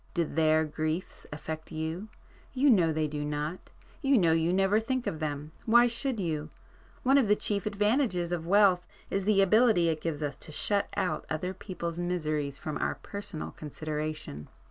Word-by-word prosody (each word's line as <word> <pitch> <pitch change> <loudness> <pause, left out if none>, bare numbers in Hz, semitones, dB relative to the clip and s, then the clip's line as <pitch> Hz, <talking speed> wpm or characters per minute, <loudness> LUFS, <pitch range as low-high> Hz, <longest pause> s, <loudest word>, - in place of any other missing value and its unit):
Do 170 - +2
their 160 0 +2
griefs 155 +3 -4
affect 155 +2 -6
you? 160 +5 -4 0.5
You 270 +1 +4
know 175 -7 +4
they 155 0 0
do 150 0 -4
not,—you 155 - -2
know 170 -6 +4
you 165 +1 +2
never 195 +3 +3
think 255 +2 -2
of 155 - -3
them,—why 155 +11 +2
should 245 0 0
you? 155 -5 -2 0.5
One 270 +2 +5
of 250 - +2
the 210 - +5
chief 205 -1 0
advantages 210 -4 +1
of 165 -2 -2
wealth 190 -2 +5 0.3
is 195 -1 -1
the 200 -2 +4
ability 215 -4 +4
it 155 -1 -2
gives 155 -2 -3
us 145 - -3
to - - -8
shut 200 +6 +1
out 185 - -1
other 180 +4 -2
people's 175 -3 -5
miseries 155 -5 -1
from 155 -2 -4
our - - 0
personal 200 -6 -6
consideration." 155 - -5
170 Hz, 165 wpm, -29 LUFS, 155-205 Hz, 0.5 s, One